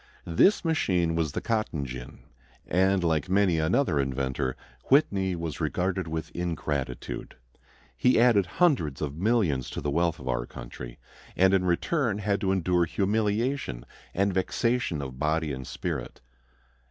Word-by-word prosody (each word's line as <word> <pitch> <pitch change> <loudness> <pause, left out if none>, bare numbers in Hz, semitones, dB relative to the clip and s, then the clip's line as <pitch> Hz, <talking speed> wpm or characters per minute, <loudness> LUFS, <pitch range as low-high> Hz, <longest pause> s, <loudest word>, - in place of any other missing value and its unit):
This 90 - +3
machine 90 - +1
was 80 -3 -1
the - - -2
cotton 110 -10 -1
gin. 65 -1 -8 0.4
And, 95 +1 +2
like 80 0 +1
many 95 -3 +3
another 80 - +2
inventor, 65 -1 -1 0.3
Whitney 100 - +3
was 85 -4 -5
rewarded 95 -1 -1
with 80 0 -4
ingratitude. 75 -7 -4 0.6
He 125 -2 +3
added 115 -6 +4
hundreds 130 - +2
of 70 -1 -3
millions 90 - +1
to - - -5
the 75 - -2
wealth 85 +1 +1
of 65 - -9
our - - -1
country, - - -9 0.4
and 95 +1 +5
in 95 -1 +3
return 110 - +1
had 100 -1 -1
to 95 -2 +1
endure 90 -2 +2
humiliation 105 - -1 0.3
and 100 +1 +2
vexation 95 - 0
of 65 -1 -7
body 75 0 0
and 65 -1 -6
spirit. - - -4
90 Hz, 140 wpm, -27 LUFS, 75-100 Hz, 0.6 s, and